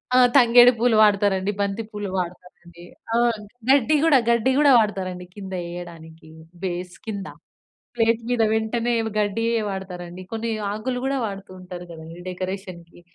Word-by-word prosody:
ఆ! - - +6 0.2
తంగేడి 245 0 +7
పూలు 235 -1 +3
వాడతారండి. 200 -2 +3
బంతి 200 +3 -2
పూలు 205 -2 -5
వాడతారండి. 175 -1 -7 0.3
ఆహ్, 235 -2 +2 0.3
గడ్డి 280 +2 +4
కూడా 300 -4 +6
గడ్డి 235 +2 +3
కూడా 290 -2 +6
వాడతారండి 185 -4 -2
కింద 195 -2 -8 0.2
ఎయడానికి 165 -2 -10 0.3
బేస్ 180 -1 -4
కింద. 200 -3 -5 0.7
ప్లేట్ 230 0 +2
మీద 245 -2 +1
వెంటనే 230 +2 0 0.3
గడ్డి 210 +2 0 0.2
వాడతారండి. 180 -2 -7
కొన్ని 225 +1 -3 0.2
ఆకులు 245 +4 -3
కూడా 275 0 0
వాడుతూ 195 -2 -7
ఉంటారు 180 -1 -9
కదండీ. 165 +1 -10
డెకరేషన్‌కి. 185 -2 -7
200 Hz, 130 wpm, -23 LUFS, 180-230 Hz, 0.7 s, తంగేడి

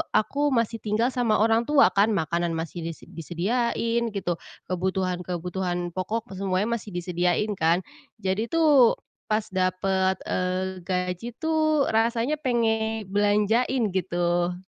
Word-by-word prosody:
aku 285 +7 +2
masih 230 -1 0
tinggal 215 +3 +1
sama 240 -4 +1
orang 225 +2 +3
tua 295 -2 +6
kan, 205 +3 +4
makanan 170 +1 0
masih 165 +2 -4
dise 165 -1 -6
disediain 230 +7 -1
gitu, 190 -4 -2 0.3
kebutuhan-kebutuhan 180 -1 -2
pokok 215 +5 -3
semuanya 195 +4 0
masih 210 - -11
disediain 180 +3 0
kan, 165 +2 +3 0.4
jadi 195 +4 0
tuh 300 -7 +5 0.3
pas 215 0 +1
dapet, 190 0 +1
eee, 185 +1 -2
gaji 180 +3 -2
tuh 310 -2 +2
rasanya 230 +4 +1
pengen 225 -4 0
belanjain 210 +3 +2
gitu. 175 -1 0
200 Hz, 120 wpm, -25 LUFS, 180-230 Hz, 0.4 s, tua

